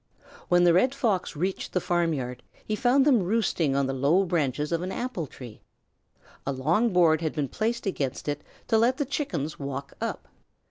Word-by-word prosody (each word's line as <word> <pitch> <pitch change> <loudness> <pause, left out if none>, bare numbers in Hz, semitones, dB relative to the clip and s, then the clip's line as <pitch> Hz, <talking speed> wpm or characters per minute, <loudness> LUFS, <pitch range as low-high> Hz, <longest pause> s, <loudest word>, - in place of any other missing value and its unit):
When 175 0 +5
the 175 -1 +6
Red 255 +10 +3
Fox 200 -11 0
reached 185 +5 -3
the 180 - +2
farmyard, 165 -9 -1 0.2
he 215 - -1
found 260 +4 +3
them 260 -7 +5
roosting 180 -7 +1
on 140 0 +2
the 135 - -2
low 145 +9 +3
branches 150 -4 -1
of 170 0 0
an 185 +1 -3
apple 190 - -3
tree. 120 -4 -11 0.8
A 140 - -2
long 170 - +1
board 170 -3 +4
had 160 -2 -1
been 145 -2 -1
placed 230 - -2
against 140 -10 -3
it 145 0 -2 0.3
to 225 - +4
let 245 +3 +3
the 290 - 0
Chickens 260 - -3
walk 140 0 -5
up. - - -4
175 Hz, 185 wpm, -27 LUFS, 140-220 Hz, 0.8 s, the